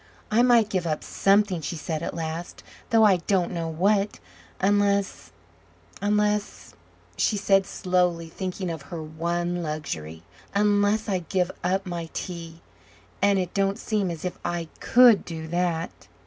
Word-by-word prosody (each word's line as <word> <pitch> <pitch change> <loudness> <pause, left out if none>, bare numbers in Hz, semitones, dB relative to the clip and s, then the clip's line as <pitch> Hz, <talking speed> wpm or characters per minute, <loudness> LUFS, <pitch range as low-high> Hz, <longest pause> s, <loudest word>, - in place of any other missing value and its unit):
"I 225 +3 +4
might 240 -3 +5
give 185 -5 -1
up 155 -1 -2
something," 195 -3 +2
she 170 +3 -4
said 155 0 -4
at - - -4
last, 165 +1 -5 0.3
"though 225 -2 +5
I 200 -4 +6
don't 180 0 0
know 170 -2 -3
what, 195 +5 +1 0.4
unless 200 0 +1 0.7
unless," 210 0 0 0.4
she 210 - +1
said 195 -1 +3
slowly, 180 -2 0
thinking 185 +1 -4
of 160 -3 -6
her 165 -2 -5
one 170 +3 -2
luxury, 85 - -5 0.3
"unless 205 +1 +2
I 190 -3 0
give 180 +1 -1
up 190 +3 0
my 170 -2 -5
tea, 170 -2 -6 0.6
and 200 0 +4
it 180 -2 -2
don't 195 0 +1
seem 210 -5 -1
as 165 0 -6
if 180 - -4
I 170 -2 -3
COULD 240 -3 +6
do 160 -2 -7
that." 175 -1 -1
180 Hz, 150 wpm, -25 LUFS, 165-200 Hz, 0.7 s, I